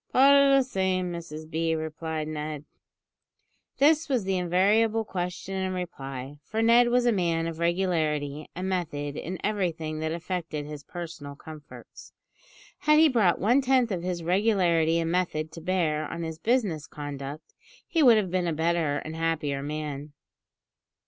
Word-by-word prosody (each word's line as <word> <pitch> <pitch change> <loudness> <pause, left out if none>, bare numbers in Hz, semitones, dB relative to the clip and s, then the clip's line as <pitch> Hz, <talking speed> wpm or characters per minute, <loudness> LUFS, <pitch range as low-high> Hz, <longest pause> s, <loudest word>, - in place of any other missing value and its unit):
"Pot 275 +2 +6
o' 280 -1 +6
the 270 - +4
same, 190 -6 -1
Mrs 160 -2 -7
B," 160 +1 0
replied 160 0 -4
Ned. 150 -1 -5 1.1
This 305 +2 +4
was 255 -6 +1
the 190 0 0
invariable 205 +5 +2
question 180 0 -4
and 190 -1 -2
reply, 135 -6 -6
for 220 +9 -2
Ned 235 +1 +6
was 245 0 +2
a 240 - +4
man 170 -5 0
of 165 -1 -5
regularity 155 -5 0
and 185 +2 -3
method 150 -6 -2
in 180 +5 -5
everything 165 -7 -2
that 160 0 -2
affected 170 -3 -4
his 150 -1 -8
personal 160 -5 -8
comforts. 155 0 -12 0.7
Had 300 0 +4
he 315 0 +7
brought 215 -9 +3
one 240 +8 +3
tenth 255 -3 +2
of 180 -3 -2
this 175 -1 -3
regularity 175 -4 +2
and 165 0 0
method 165 -3 -1
to 165 - -9
bear 155 -4 0
on 170 - -5
his 160 -1 -5
business 205 - 0
conduct, 145 0 -7 0.3
he 330 - +1
would 240 -6 +7
have 195 -5 0
been 180 -1 0
a 165 - 0
better 160 -2 +1
and 155 - -5
a 160 - -7
happier 150 -4 -1
man. 150 0 -5
170 Hz, 160 wpm, -27 LUFS, 155-195 Hz, 1.1 s, he